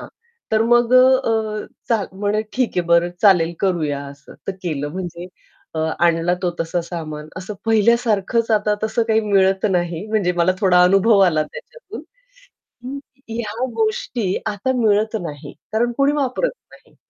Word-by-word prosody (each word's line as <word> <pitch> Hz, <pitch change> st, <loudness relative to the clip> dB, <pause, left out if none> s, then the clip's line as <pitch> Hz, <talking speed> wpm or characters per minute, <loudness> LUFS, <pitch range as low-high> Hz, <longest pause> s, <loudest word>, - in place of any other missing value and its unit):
हां. -, -, -9 dB, 0.4 s
तर 220 Hz, 0 st, +4 dB
मग 240 Hz, 0 st, +4 dB
अ, 255 Hz, -, +9 dB, 0.3 s
अ, 215 Hz, -1 st, -2 dB, 0.2 s
चा 225 Hz, -3 st, +2 dB
म्हणे, 205 Hz, +2 st, -1 dB
"ठीक 255 Hz, -2 st, 0 dB
आहे, -, -, +4 dB
बरं 170 Hz, 0 st, +3 dB
चालेल 175 Hz, -5 st, +5 dB
करूया," 160 Hz, -7 st, 0 dB
असं. 140 Hz, 0 st, -13 dB
तर -, -, -1 dB
केलं 150 Hz, -5 st, -3 dB
म्हणजे 175 Hz, -1 st, -6 dB, 0.5 s
अ, -, -, -3 dB, 0.3 s
आणला 170 Hz, +1 st, +1 dB
तो 180 Hz, -, +1 dB
तसा 165 Hz, +1 st, -1 dB
सामान 155 Hz, -3 st, -7 dB
असं 185 Hz, +3 st, -6 dB
पहिल्यासारखच 225 Hz, 0 st, +2 dB
आता 210 Hz, -1 st, +2 dB
तसं 220 Hz, +2 st, 0 dB
काही 220 Hz, 0 st, +3 dB
मिळत 195 Hz, -2 st, +2 dB
नाही 175 Hz, +1 st, -1 dB
म्हणजे 210 Hz, -5 st, 0 dB
मला 175 Hz, +2 st, +3 dB
थोडा 180 Hz, -3 st, +5 dB
अनुभव 195 Hz, +4 st, +4 dB
आला 155 Hz, -3 st, +2 dB
त्याच्यातून 410 Hz, -, -11 dB, 0.8 s
हं, 265 Hz, +3 st, -5 dB, 0.3 s
ह्या 225 Hz, +1 st, -3 dB
गोष्टी 435 Hz, -, -1 dB, 0.2 s
आता 210 Hz, +4 st, -1 dB
मिळत 220 Hz, -1 st, +2 dB
नाही 150 Hz, -5 st, -7 dB, 0.2 s
कारण 240 Hz, +2 st, +1 dB
कोणी 280 Hz, +1 st, +3 dB
वापरत 290 Hz, -, 0 dB, 0.2 s
नाही. -, -, -20 dB
205 Hz, 155 wpm, -20 LUFS, 175-225 Hz, 0.8 s, अ